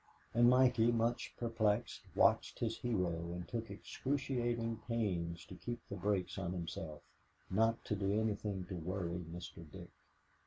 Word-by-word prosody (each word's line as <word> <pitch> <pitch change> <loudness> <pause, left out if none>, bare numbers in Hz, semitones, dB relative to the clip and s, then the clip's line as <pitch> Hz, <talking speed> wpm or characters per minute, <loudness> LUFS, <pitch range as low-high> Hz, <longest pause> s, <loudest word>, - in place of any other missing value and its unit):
And 120 +1 +7
Mikey, 125 -2 +5
much 115 +1 +1
perplexed, 115 -3 +1
watched - - +4
his 115 -1 -1
hero 85 -8 0
and 90 0 -5
took 115 -2 -3
excruciating 120 0 -1
pains 90 -8 -1
to - - -10
keep 120 +5 -4
the 100 - -3
brakes 100 0 0
on 90 -2 -2
himself, 80 -3 -5 0.5
not 115 +4 +2
to 105 - 0
do 100 +1 +1
anything 105 -3 -1
to 95 - -6
worry 90 0 -2
Mr. 85 -1 -7
Dick. - - -9
105 Hz, 145 wpm, -37 LUFS, 90-115 Hz, 0.5 s, And